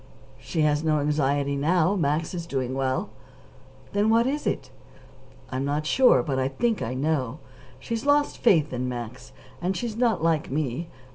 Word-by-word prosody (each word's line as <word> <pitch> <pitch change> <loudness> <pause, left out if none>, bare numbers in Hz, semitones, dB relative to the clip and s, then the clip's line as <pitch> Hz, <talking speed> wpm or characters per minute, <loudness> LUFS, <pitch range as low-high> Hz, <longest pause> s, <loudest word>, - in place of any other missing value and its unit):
"She 160 - -2
has 150 0 +2
no 155 -1 +2
anxiety 145 -1 +1
now. 170 +6 +2
Max 155 -1 0
is 170 -2 -5
doing 130 -4 -2
well." 135 +9 -1 0.8
"Then 205 +2 +2
what 230 +1 +4
is 290 +3 -1
it?" - - -2 0.8
"I'm 130 +1 -2
not 145 +2 -1
quite - - -14
sure, 245 - +5
but 135 0 -1
I 130 - +1
think 225 - -1
I 125 +3 -3
know. 140 -2 -1 0.4
She's 230 - -4
lost 290 +1 +2
faith 160 - +3
in 125 0 -2
Max, 120 - -7 0.3
and 185 +2 -1
she's 235 -3 -3
not 230 -7 +1
like 165 -2 +1
me. 150 +2 -2
150 Hz, 170 wpm, -25 LUFS, 135-195 Hz, 0.8 s, sure